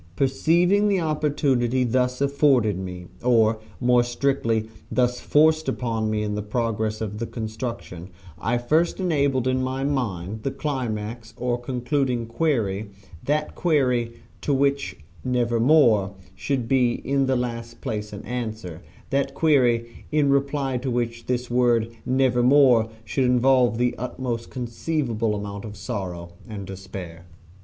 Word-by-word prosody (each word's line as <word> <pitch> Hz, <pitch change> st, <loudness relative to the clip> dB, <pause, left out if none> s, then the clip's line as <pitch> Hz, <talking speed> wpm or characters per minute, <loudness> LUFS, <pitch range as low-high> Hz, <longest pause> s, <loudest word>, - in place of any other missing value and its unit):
Perceiving 175 Hz, -, +3 dB
the 200 Hz, -2 st, +2 dB
opportunity 140 Hz, -6 st, +1 dB
thus 125 Hz, +1 st, 0 dB
afforded 135 Hz, -8 st, +3 dB
me, 90 Hz, -1 st, -6 dB, 0.2 s
or, 115 Hz, -3 st, +3 dB, 0.2 s
more 125 Hz, 0 st, +4 dB
strictly, 120 Hz, -3 st, 0 dB, 0.2 s
thus 125 Hz, -1 st, +1 dB
forced 155 Hz, 0 st, +3 dB
upon 115 Hz, -4 st, -1 dB
me 105 Hz, 0 st, 0 dB
in 105 Hz, 0 st, -2 dB
the 105 Hz, -, -2 dB
progress 110 Hz, 0 st, -2 dB
of 105 Hz, -1 st, -4 dB
the 115 Hz, -, -3 dB
construction, 110 Hz, -6 st, -6 dB, 0.3 s
I 120 Hz, +3 st, 0 dB
first 155 Hz, +11 st, +1 dB
established 140 Hz, -8 st, +1 dB
in 130 Hz, 0 st, +1 dB
my 130 Hz, +1 st, -2 dB
mind 110 Hz, -8 st, -2 dB
the 135 Hz, -, -1 dB
climax 120 Hz, -5 st, -4 dB
or 125 Hz, -1 st, -1 dB
concluding 125 Hz, 0 st, -1 dB
query 115 Hz, -6 st, -1 dB, 0.4 s
that 150 Hz, +1 st, 0 dB
query 125 Hz, -8 st, +1 dB, 0.3 s
to 145 Hz, -, +1 dB
which 140 Hz, -9 st, 0 dB, 0.3 s
"Nevermore" 120 Hz, -4 st, +3 dB, 0.2 s
should 130 Hz, -1 st, -2 dB
be 125 Hz, -2 st, +3 dB
in 135 Hz, +1 st, 0 dB
the 130 Hz, -, +2 dB
last 115 Hz, -1 st, -4 dB
place 105 Hz, -1 st, -4 dB
an 100 Hz, -1 st, -8 dB
answer 110 Hz, -8 st, -5 dB, 0.3 s
that 135 Hz, 0 st, 0 dB
query 120 Hz, -7 st, +2 dB
in 150 Hz, -2 st, +3 dB
reply 140 Hz, -1 st, 0 dB
to 130 Hz, +2 st, -3 dB
which 115 Hz, -1 st, -2 dB
this 125 Hz, -1 st, -2 dB
word 120 Hz, -2 st, +2 dB, 0.2 s
"Nevermore" 125 Hz, -2 st, +4 dB, 0.2 s
should 130 Hz, +5 st, 0 dB
involve 125 Hz, -1 st, +4 dB
the 125 Hz, 0 st, +1 dB
utmost 125 Hz, -1 st, -4 dB
conceivable 120 Hz, -2 st, -2 dB
amount 100 Hz, -1 st, -5 dB
of 105 Hz, -2 st, -8 dB
sorrow 95 Hz, -6 st, -5 dB, 0.2 s
and 100 Hz, -3 st, -6 dB
despair. 95 Hz, -3 st, -8 dB
120 Hz, 135 wpm, -24 LUFS, 110-135 Hz, 0.4 s, more